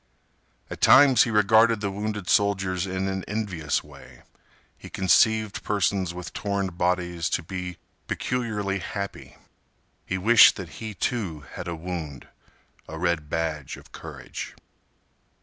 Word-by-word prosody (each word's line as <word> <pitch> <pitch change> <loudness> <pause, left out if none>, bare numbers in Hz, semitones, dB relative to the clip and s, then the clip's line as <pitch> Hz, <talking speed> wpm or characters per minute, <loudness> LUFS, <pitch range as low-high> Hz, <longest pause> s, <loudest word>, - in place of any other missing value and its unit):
At - - -7
times 135 -3 +7
he - - -3
regarded 110 +1 +4
the 100 -1 -2
wounded 105 -1 -4
soldiers 95 -2 +1
in 95 +1 -2
an 95 -1 -3
envious 95 -8 -2
way. - - -15 0.5
He - - -12
conceived 110 +3 +2
persons 100 -3 0
with 90 -1 -8
torn 100 -2 -2
bodies 90 -1 -1
to - - -1
be 90 0 -6 0.3
peculiarly 105 -6 -2
happy. 100 +3 -6 0.7
He 95 - -3
wished 110 +5 +7
that 95 -4 -7
he, 110 -2 -5
too, 95 -12 -2
had - - -6
a 85 - -3
wound, 80 -5 -6 0.6
a 80 - -7
red 85 -3 -1
badge 80 -4 -3
of - - -16
courage. - - -8
95 Hz, 130 wpm, -25 LUFS, 85-105 Hz, 0.7 s, times